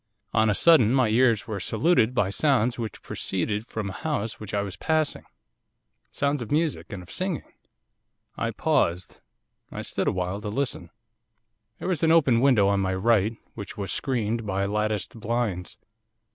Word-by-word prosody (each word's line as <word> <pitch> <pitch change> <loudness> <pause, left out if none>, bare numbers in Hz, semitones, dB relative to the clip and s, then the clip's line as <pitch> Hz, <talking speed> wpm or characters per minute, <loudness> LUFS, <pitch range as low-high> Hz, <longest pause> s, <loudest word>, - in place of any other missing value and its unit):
On 110 -1 +3
a 105 - +2
sudden 135 -7 +5
my 130 -4 +3
ears 115 -2 +3
were 105 -2 -4
saluted 120 - +2
by 100 -4 +1
sounds 125 -1 +1
which 110 -4 -5
proceeded 105 +4 -2
from 110 -3 -4
a 95 - -5
house 115 -7 -3
which 105 - -8
I 100 0 0
was 100 -2 -6
passing, 155 - -1 0.8
sounds 140 -1 -1
of 115 - -6
music 155 0 0
and 95 -3 -6
of 90 - -13
singing. 185 -3 -2 0.9
'I - - -1
paused. 85 +2 0 0.5
I - - -5
stood - - -2
awhile 90 +2 -1
to 105 - -4
listen. 115 -7 -3 0.9
'There - - -5
was 175 -5 -1
an 160 -1 +4
open 140 -8 +4
window 125 -7 +5
on 100 0 +2
my 95 -1 0
right, 110 +2 +2 0.2
which 105 -3 -8
was 100 -2 -4
screened 115 -4 -1
by 100 -1 -1
latticed 105 +2 -2
blinds. 105 -5 -2
110 Hz, 165 wpm, -26 LUFS, 100-130 Hz, 0.9 s, sudden